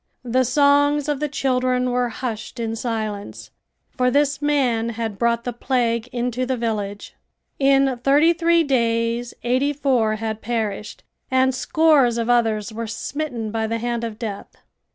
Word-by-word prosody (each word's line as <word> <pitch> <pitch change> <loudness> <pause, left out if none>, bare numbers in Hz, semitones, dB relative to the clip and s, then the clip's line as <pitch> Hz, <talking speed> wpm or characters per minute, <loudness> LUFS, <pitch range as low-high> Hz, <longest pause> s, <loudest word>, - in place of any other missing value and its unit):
The 255 +2 +2
songs 285 +2 +3
of 295 -2 -1
the 300 - -1
children 255 -2 0
were 245 0 0
hushed 230 -2 -5
in 225 -1 -2
silence, 215 -3 -4 0.4
for 250 0 +1
this 285 +1 +1
man 255 -6 +1
had 220 -4 -4
brought 235 0 +1
the 245 - -3
plague 235 -1 0
into 245 +1 -2
the 255 0 -1
village. 210 -3 -3 0.5
In 270 -2 +3
thirty 295 +5 +5
three 335 0 +3
days 235 -3 0
eighty 260 +4 +1
four 255 -7 +1
had 220 0 -4
perished 215 -2 -3 0.3
and 260 0 +3
scores 275 -3 +3
of 230 +1 0
others 225 -2 +1
were 230 +1 -4
smitten 235 -1 -4
by 220 0 -1
the 230 +1 -1
hand 235 0 -2
of 225 -2 -5
death. 215 -4 -6
245 Hz, 155 wpm, -22 LUFS, 225-270 Hz, 0.5 s, thirty